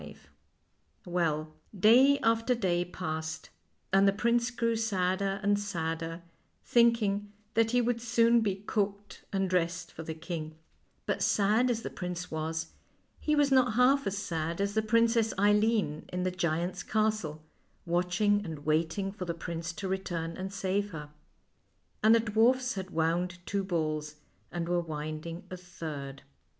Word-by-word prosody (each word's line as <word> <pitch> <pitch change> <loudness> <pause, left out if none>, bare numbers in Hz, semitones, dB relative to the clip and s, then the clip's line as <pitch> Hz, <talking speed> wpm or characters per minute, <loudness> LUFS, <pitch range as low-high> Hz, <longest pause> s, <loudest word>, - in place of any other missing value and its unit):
142 - - -11
FAIEY - - -32
TALES 175 - -10
Well, 155 -3 0 0.3
day 255 +8 +6
after 230 +2 +2
day 180 -6 +1
passed, 160 -3 -5 0.4
and 195 +1 +6
the - - +6
prince 235 +3 +1
grew 230 -1 0
sadder 195 -2 0
and 205 0 +3
sadder, 165 -3 -3 0.4
thinking 215 -4 +3 0.2
that 225 0 +3
he 245 +1 +3
would 235 0 0
soon 235 0 +4
be 200 -4 0
cooked 205 0 -3
and 195 -1 0
dressed 170 -2 -1
for - - -8
the 160 0 -5
king; 160 -1 -6 0.5
but - - -1
sad 215 +5 +3
as 230 -1 -1
the - - -5
prince 180 -1 -5
was, 160 +1 -3 0.5
he 300 - +1
was 290 -1 +3
not 255 -3 +4
half 260 +1 +4
as 195 +1 -2
sad 165 -3 -3
as 200 0 0
the 220 - +2
Princess 230 0 +2
Eileen 205 -5 +2
in 180 0 -2
the 185 - 0
giant's 175 +1 -1
castle, 215 -8 -1 0.4
watching 180 +4 +1
and 160 -5 -7
waiting 165 +5 0
for 195 -2 -6
the 170 -1 -3
prince 170 0 -4
to 195 - -5
return 175 -3 -3
and 190 +1 -5
save 200 +1 -1
her. 150 -2 -7 0.9
And 220 +2 +6
the - - +5
dwarfs 235 +4 +2
had 190 -1 -5
wound 175 +2 0
two 200 -1 -1
balls, 155 -4 -2 0.4
and 170 -1 -3
were 175 0 +1
winding 155 +1 -5
a 185 - -5
third. 155 -6 -7
190 Hz, 160 wpm, -30 LUFS, 165-220 Hz, 0.9 s, day